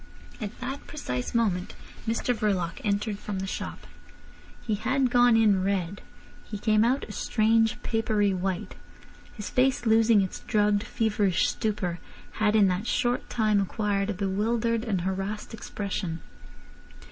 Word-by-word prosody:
At 210 +1 -6
that 270 +3 -5
precise 125 - -4
moment 195 -6 0 0.3
Mr 230 +2 +1
Verloc 195 -7 -1
entered 205 0 -1
from 205 -2 -5
the 190 - -2
shop. 195 - -5 0.7
He 220 - -2
had 255 +4 +1
gone 245 -2 +5
in 205 -4 +4
red. 195 -1 -1 0.4
He 210 - -6
came 215 +1 +3
out 255 +4 +2
a - - -8
strange 225 +2 +2
papery 215 -3 +1
white. 185 0 -2 0.6
His 210 -2 -6
face, 255 -1 +2
losing 225 -1 +5
its 190 - -3
drugged, 210 -1 +2
feverish 210 -5 +1
stupor, 195 -6 -2 0.4
had 215 0 +3
in 205 -2 +6
that 185 +4 -1
short 245 0 0
time 215 -3 +2
acquired 200 0 -1
a 210 - -1
bewildered 220 +4 0
and 200 -7 -1
harassed 195 +4 -3
expression. 195 -6 -4
210 Hz, 140 wpm, -27 LUFS, 195-225 Hz, 0.7 s, in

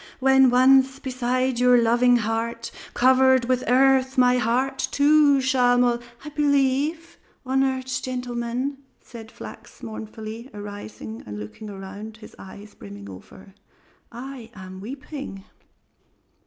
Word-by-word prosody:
"When 265 0 +5
once 265 +1 +4
beside 255 -1 -1
your 250 0 +5
loving 240 +2 +4
heart 230 +1 -2 0.2
covered 260 0 +4
with 255 0 0
earth 265 +1 +3
my 250 0 +4
heart 255 +4 0
too 290 -1 +4
shall 250 -2 +3
mol 245 -1 +2
" 240 +4 -20
"I - - -5
believe, 290 +3 0 0.3
honored 265 0 0
gentlemen," 250 +1 -3 0.2
said 225 -2 -12
Flachs - - -12
mournfully, 220 +2 -8
arising 115 - -8
and 105 0 -7
looking 105 - -9
around, 200 +2 -9
his 215 - -14
eyes 200 +2 -12
brimming 100 0 -11
over, 190 - -14 0.6
"I 245 -1 -9
am 185 -1 -10
weeping." 265 -3 -8
250 Hz, 120 wpm, -23 LUFS, 220-265 Hz, 0.6 s, When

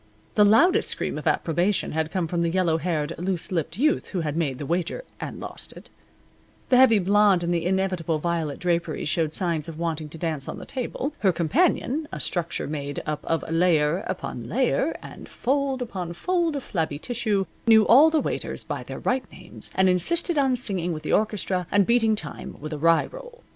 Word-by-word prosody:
The 210 - +5
loudest 345 - +5
scream - - -2
of - - -5
approbation 175 +5 +1
had 160 0 -1
come 185 -2 -1
from 170 +1 -1
the 170 - +1
yellow 170 -2 +1
haired, 160 -2 -1
loose 180 -1 -2
lipped 165 -1 -2
youth 300 +5 +2
who 185 - -3
had 150 -2 -2
made 145 -6 -1
the 145 - -5
wager, 175 - -2 0.2
and - - -6
lost - - -7
it. - - -14 0.8
The 250 - +5
heavy 255 -4 +7
blonde 200 -1 +4
in 170 - -1
the 170 -1 0
inevitable 185 -4 0
violet 160 -2 -2
draperies 170 -4 -1
showed 160 0 +1
signs 165 -3 -1
of 160 - -8
wanting 160 -2 -3
to 160 - -9
dance 155 -4 -3
on - - -5
the - - -8
table. 265 +3 -4
Her 195 -3 +3
companion 285 - +1
a - - -5
structure 175 -2 -2
made 145 -1 -4
up 150 -1 -3
of 165 - -1
layer 165 +1 +2
upon - - -5
layer, - - +1
and - - -10
fold 270 0 -1
upon 185 -7 -5
fold 340 - 0
of 280 - -4
flabby 160 -6 -2
tissue 215 0 -1 0.2
knew 220 -2 +7
all 285 +7 +7
the 315 -1 +2
waiters - - -3
by - - -4
their - - -7
right 255 +1 -1
names, - - -7
and 190 0 +4
insisted 320 - +2
on 270 -3 +3
singing 190 -8 -1
with 155 -1 -6
the - - -1
orchestra 195 -4 0
and 200 -1 +4
beating 225 -1 +3
time 150 -8 -7
with 155 +2 -6
a 150 - -5
rye 165 +1 +4
roll. - - -12
180 Hz, 200 wpm, -25 LUFS, 165-230 Hz, 0.8 s, heavy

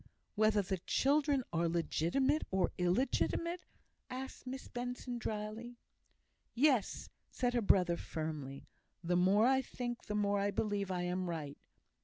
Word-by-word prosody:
"Whether 215 -1 +3
the 190 0 -2
children 280 - +2
are 165 0 +2
legitimate 175 - +1
or 190 -2 +1
illegitimate?" 270 - +1 0.5
asked 260 0 -7
Miss 265 +1 -5
Benson, 245 0 -4
drily. 220 +2 -4 0.8
"Yes!" 255 -5 +2 0.2
said 245 -1 0
her 240 - +2
brother, 180 -4 +4
firmly. 150 -5 -5 0.4
"The 175 +1 +1
more 190 +5 +5
I 265 +1 +4
think, 240 -2 -5
the 210 - -2
more 205 -1 +2
I 200 +1 +1
believe 205 -1 -1
I 180 -1 -1
am 180 0 -1
right. 150 -4 -5
210 Hz, 135 wpm, -35 LUFS, 180-250 Hz, 0.8 s, more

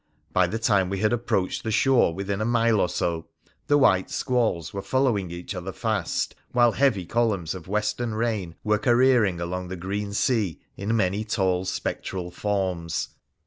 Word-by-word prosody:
By 90 -1 +4
the 110 - -2
time 100 -5 +2
we 100 - -2
had 105 +4 +1
approached 110 -6 -1
the 110 - -2
shore 120 -1 +4
within 100 +3 -3
a - - +2
mile 115 -2 +3
or 90 - +1
so 85 -1 -2 0.4
the 145 - +4
white 95 -9 +3
squalls 115 - 0
were 100 - -3
following 110 -4 +1
each 85 +4 -6
other 90 0 -5
fast, 105 -2 -1 0.2
while 120 -1 +5
heavy 110 -6 +2
columns 105 -6 0
of 90 -2 -9
western 105 +3 -1
rain 110 -7 -2
were 105 0 +2
careering 120 -7 +3
along 90 +1 -3
the 95 - -5
green 100 +3 -3
sea 110 - +1 0.2
in 110 +4 -1
many 100 +1 +1
tall 95 -4 0
spectral 90 0 -3
forms. 90 -4 -2
100 Hz, 170 wpm, -25 LUFS, 90-115 Hz, 0.4 s, while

